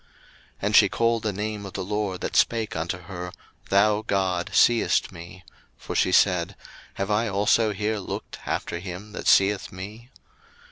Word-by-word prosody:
01:016:013 - - -33 0.5
And - - +1
she - - +7
called 115 0 +1
the 110 -2 -1
name 105 +1 -4
of 100 - -8
the - - -3
LORD 100 -1 -3
that - - -4
spake 115 -2 +2
unto 85 +3 -2
her, 90 0 -7 0.4
Thou 105 +2 +3
God 95 -4 -1
seest 120 -1 +3
me: 85 +2 -11 0.3
for - - -7
she 90 - +2
said, 90 -2 +3 0.4
Have 100 +1 -2
I 110 +3 +2
also 105 +2 +2
here 105 +1 -2
looked 95 - -6
after 85 - -2
him 90 +3 -8
that - - -6
seeth 100 0 +3
me? 105 +6 -9
100 Hz, 170 wpm, -25 LUFS, 95-105 Hz, 0.5 s, she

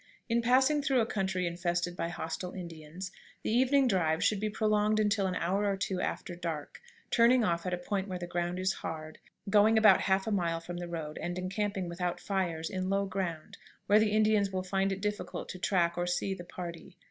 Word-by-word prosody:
In 235 -1 +2
passing 265 +5 +4
through 275 -2 +2
a - - +2
country 190 -4 -1
infested 175 0 -1
by 170 - -2
hostile 175 +1 -5
Indians, 170 +1 -7 0.3
the - - -1
evening 260 +3 +4
drive 165 -7 +1
should 210 - +2
be 215 +1 -1
prolonged 215 0 +2
until 205 -2 +2
an 185 - -2
hour 195 +5 0
or 200 -1 0
two 190 -1 -2
after 175 - -3
dark, 165 - -5 0.3
turning 235 +1 +5
off 170 -2 0
at 180 - -1
a - - -7
point 190 +2 -2
where 185 -2 -4
the 175 - -5
ground 175 0 -2
is 185 +1 +1
hard, 155 -1 -6 0.3
going 215 +2 +5
about 215 -4 +7
half 190 0 +2
a 220 - -2
mile 170 -4 0
from 175 +1 -7
the 175 0 -5
road, 160 -3 -5
and 175 +1 -3
encamping 195 +1 -2
without 175 0 -2
fires, 175 -5 -2
in 185 0 -3
low 200 0 +1
ground, 185 -5 -4 0.3
where 210 +1 +5
the 215 0 +3
Indians 215 -1 +3
will 185 -1 -2
find 195 +1 0
it 195 0 -3
difficult 210 0 -3
to 185 - -6
track 175 -2 +1
or 175 - 0
see 180 +2 0
the 185 -2 -7
party. 175 0 -8
185 Hz, 210 wpm, -31 LUFS, 175-210 Hz, 0.3 s, about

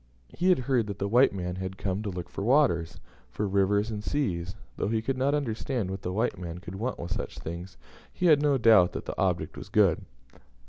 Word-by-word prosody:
He 180 +3 0
had 185 - +5
heard 125 -5 +1
that 100 -2 -5
the 100 - -2
white 120 +6 +5
man 90 -2 -4
had 95 0 -5
come 95 +1 -2
to 105 - -3
look 90 -2 -5
for 100 - -6
waters, 90 - +2 0.3
for 105 - -2
rivers, 100 +3 +2
and 105 -1 -5
seas; 95 -11 -2 0.2
though - - -2
he 110 +1 +1
could 130 +4 -2
not 135 +3 +1
understand 120 -5 -2
what 95 0 -5
the 90 - -3
white 105 -1 -1
man 85 -2 -6
could 90 0 -9
want 115 +6 -3
with 85 - -7
such - - -5
things, 85 +3 -7 0.3
he 180 - -3
had 155 -4 +6
no 145 -2 +3
doubt 110 -7 +5
that - - -5
the - - -5
object - - 0
was - - -9
good. 100 -6 +3
100 Hz, 225 wpm, -28 LUFS, 90-125 Hz, 0.3 s, had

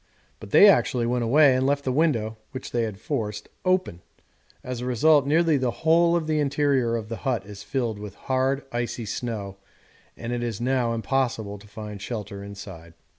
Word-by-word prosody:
But 105 - -10
they 205 - +8
actually 130 -11 +3
went 120 0 0
away 140 +2 +5
and 130 - +1
left 140 0 +1
the 130 - -1
window 125 -7 +1 0.2
(which 130 - -7
they 120 -1 +1
had 105 -3 -6
forced) 105 -5 -4
open; 185 - 0 0.6
as 125 -1 -5
a - - -4
result, 140 +3 +4
nearly 160 0 +3
the 130 -2 0 0.2
whole 170 +1 +5
of 170 -2 0
the 155 -1 0
interior 140 -4 +1
of 110 -2 -4
the 115 0 -5
hut 120 -8 -2
is 100 0 -10
filled 115 -4 -2
with 105 -2 -8
hard 130 +1 0
icy 120 -1 -3
snow, 105 -3 -4 0.6
and 115 +1 -4
it 120 - -2
is 115 -4 -3
now 125 -1 +1
impossible 115 -3 -1
to 105 - -16
find 105 -1 -8
shelter 100 -3 -5
inside. 95 -5 -10
120 Hz, 185 wpm, -25 LUFS, 105-140 Hz, 0.6 s, they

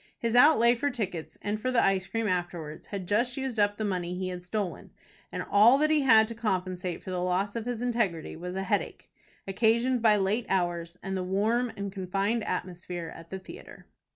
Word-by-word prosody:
His 230 0 -1
outlay 245 -3 +6
for 265 +4 -1
tickets 185 - -4
and 210 +1 -2
for 255 - -1
the 250 -2 +3
ice 190 -1 +1
cream 225 -1 -2
afterwards 175 -4 -3
had 195 -3 -5
just 240 +6 +1
used 265 -4 -3
up 205 0 +2
the 215 - -2
money 180 -3 -2
he 185 0 -3
had 180 -1 -5
stolen, 190 0 -4 0.4
and - - -3
all 220 +6 +6
that 305 +2 +2
he 305 -1 +4
had 225 -5 +6
to - - -4
compensate 185 -5 -2
for 185 - -6
the 180 -1 -2
loss 185 +3 0
of 230 -1 -3
his 245 -1 -3
integrity 225 -10 -1
was 180 +3 -6
a 190 - -2
headache, 190 - -2 0.4
occasioned 235 +5 +2
by 220 -2 +5
late 205 +4 0
hours, 175 -2 -1
and 195 0 -3
the 190 - -1
warm 220 +6 +1
and 200 0 -4
confined 195 +4 -1
atmosphere 175 -2 -4
at 165 0 -12
the 190 - -5
theatre. 185 - -12
200 Hz, 205 wpm, -28 LUFS, 180-230 Hz, 0.4 s, outlay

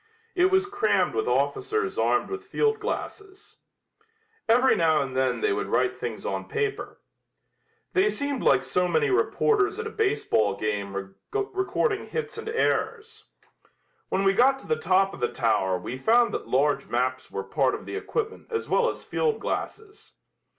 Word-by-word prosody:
It 365 0 +3
was 380 +1 +3
crammed 410 +2 +1
with 430 +1 -1
officers 420 0 0
armed - - +1
with 395 0 -5
field 435 +1 +1
glasses. 410 -3 -6 0.9
Every 250 +3 +5
now 160 -3 +3
and 130 -1 -7
then 130 0 +1
they 425 -1 +2
would 415 +1 -2
write - - +1
things - - -6
on - - -3
paper. 425 -2 -3 0.9
They 390 +2 +3
seemed 285 -7 -2
like 135 -1 +3
so 180 +7 0
many 445 - +1
reporters 415 0 +2
at 450 - -4
a 440 - -5
baseball 390 - +1
game 100 -2 -3 0.2
recording 405 +1 -1
hits 465 -1 -4
and 445 0 -6
errors. 450 -1 -1 0.8
When 195 - 0
we 195 0 +4
got 265 +6 +4
to - - -15
the 465 - +2
top 195 - +2
of - - -9
the 120 - 0
tower 95 -6 +1
we 120 +8 -6
found 235 - +3
that - - -4
large 140 +3 +1
maps 130 +2 -1
were 95 - -4
part 135 +3 +1
of - - -9
the - - -6
equipment 440 +1 -4
as 450 -1 -3
well 485 0 +2
as - - -7
field 455 -2 -1
glasses. 430 -1 -5
385 Hz, 165 wpm, -26 LUFS, -, 0.9 s, Every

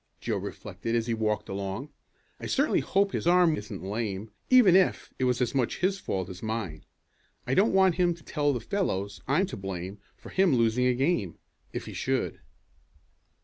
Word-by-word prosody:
Joe - - -2
reflected 115 0 -4
as 115 -1 +1
he 115 - -1
walked 110 -1 -1
along. 100 +8 -4 0.5
"I - - -5
certainly 285 +3 +2
hope 200 0 +1
his - - -2
arm 175 -2 +5
isn't 105 -2 -7
lame, 105 0 -3 0.2
even 245 -8 +7
if 190 -1 +2
it 130 - +2
was 125 0 +1
as 120 - 0
much 130 -4 0
his 190 +2 +1
fault 95 - -3
as 95 -2 -9
mine. 110 -8 -4 0.6
I 125 - -1
don't 200 +10 +4
want 190 -3 +4
him 175 -1 +3
to 165 - -18
tell 145 -2 0
the 125 - -1
fellows 100 - -2
I'm 150 +9 +3
to 195 - -7
blame 95 0 -5 0.2
for - - -12
him 190 -7 +3
losing 115 +1 +2
a 125 - +2
game 130 - 0 0.3
if - - -5
he - - -8
should." - - -1
125 Hz, 190 wpm, -28 LUFS, -, 0.6 s, even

